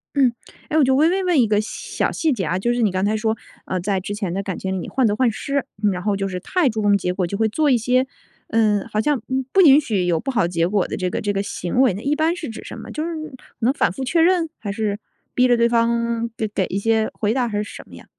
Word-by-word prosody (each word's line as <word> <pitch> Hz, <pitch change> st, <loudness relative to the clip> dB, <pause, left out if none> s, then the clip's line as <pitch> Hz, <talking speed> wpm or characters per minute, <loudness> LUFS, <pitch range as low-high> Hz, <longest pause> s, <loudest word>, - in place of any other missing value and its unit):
嗯。 260 Hz, -4 st, +4 dB, 0.4 s
诶 310 Hz, -, +1 dB
我 310 Hz, -, +5 dB
就 265 Hz, 0 st, +3 dB
微 310 Hz, +4 st, +4 dB
微 380 Hz, +2 st, 0 dB
问 355 Hz, -5 st, +2 dB
一 230 Hz, -, +3 dB
个 210 Hz, -1 st, +2 dB
小 215 Hz, -, -3 dB
细 320 Hz, -2 st, 0 dB
节 205 Hz, -7 st, -1 dB
啊， 170 Hz, +4 st, 0 dB
就 240 Hz, +6 st, 0 dB
是 240 Hz, -, -1 dB
你 210 Hz, -4 st, +3 dB
刚 185 Hz, +1 st, 0 dB
才 215 Hz, -, +1 dB
说， 220 Hz, 0 st, 0 dB, 0.3 s
呃， 185 Hz, -, -2 dB
在 195 Hz, +1 st, -1 dB
之 200 Hz, +2 st, -5 dB
前 195 Hz, -5 st, -3 dB
的 195 Hz, -, -1 dB
感 190 Hz, -, -4 dB
情 190 Hz, -1 st, -3 dB
里 -, -, -6 dB
患 260 Hz, -2 st, +1 dB
得 205 Hz, -, +2 dB
患 245 Hz, +1 st, +3 dB
失， 275 Hz, +3 st, -2 dB, 0.3 s
然 180 Hz, -, -4 dB
后 205 Hz, +1 st, 0 dB
就 195 Hz, 0 st, -2 dB
是 185 Hz, -1 st, -4 dB
太 330 Hz, -, +1 dB
注 220 Hz, -2 st, -2 dB
重 205 Hz, -1 st, +4 dB
结 180 Hz, -2 st, -2 dB
果 180 Hz, -1 st, -1 dB
就 200 Hz, +3 st, -4 dB
会 220 Hz, -, +2 dB
做 300 Hz, +7 st, +1 dB
一 255 Hz, -, +4 dB
些， 250 Hz, +3 st, +1 dB, 0.4 s
呃， 215 Hz, -3 st, +2 dB
好 215 Hz, -, 0 dB
像 285 Hz, 0 st, 0 dB, 0.3 s
不 385 Hz, -, +5 dB
允 290 Hz, -3 st, +8 dB
许 205 Hz, -10 st, -1 dB
有 170 Hz, -2 st, +1 dB
不 270 Hz, -, -3 dB
好 190 Hz, -9 st, +2 dB
结 170 Hz, -1 st, 0 dB
果 200 Hz, -1 st, +1 dB
的 -, -, -4 dB
这 185 Hz, -, -1 dB
个 -, -, -3 dB
这 205 Hz, -, 0 dB
个 195 Hz, 0 st, -1 dB
行 200 Hz, +2 st, -1 dB
为 255 Hz, -8 st, +4 dB
呢 200 Hz, -, -6 dB
一 285 Hz, +4 st, 0 dB
般 320 Hz, +3 st, +1 dB
是 320 Hz, -7 st, -6 dB
指 225 Hz, -, -8 dB
什 -, -, -8 dB
么？ -, -, -9 dB
就 305 Hz, -, -3 dB
是 335 Hz, -, -3 dB, 0.5 s
能 250 Hz, +3 st, +2 dB
反 -, -, +1 dB
复 270 Hz, -, -5 dB
确 330 Hz, +6 st, +2 dB
认？ 340 Hz, -1 st, +3 dB
还 205 Hz, -, -5 dB
是 205 Hz, 0 st, -2 dB, 0.3 s
逼 250 Hz, 0 st, +4 dB
着 245 Hz, -1 st, +4 dB
对 235 Hz, 0 st, +4 dB
方 235 Hz, 0 st, +1 dB
得 220 Hz, -, -1 dB
给 200 Hz, -2 st, -1 dB
一 195 Hz, -, -2 dB
些 220 Hz, +1 st, +1 dB
回 215 Hz, 0 st, 0 dB
答 250 Hz, -1 st, +1 dB
还 210 Hz, -2 st, -3 dB
是 210 Hz, -, 0 dB
什 205 Hz, -, -9 dB
么 -, -, -13 dB
呀？ -, -, -13 dB
225 Hz, 310 characters per minute, -21 LUFS, 200-265 Hz, 0.5 s, 允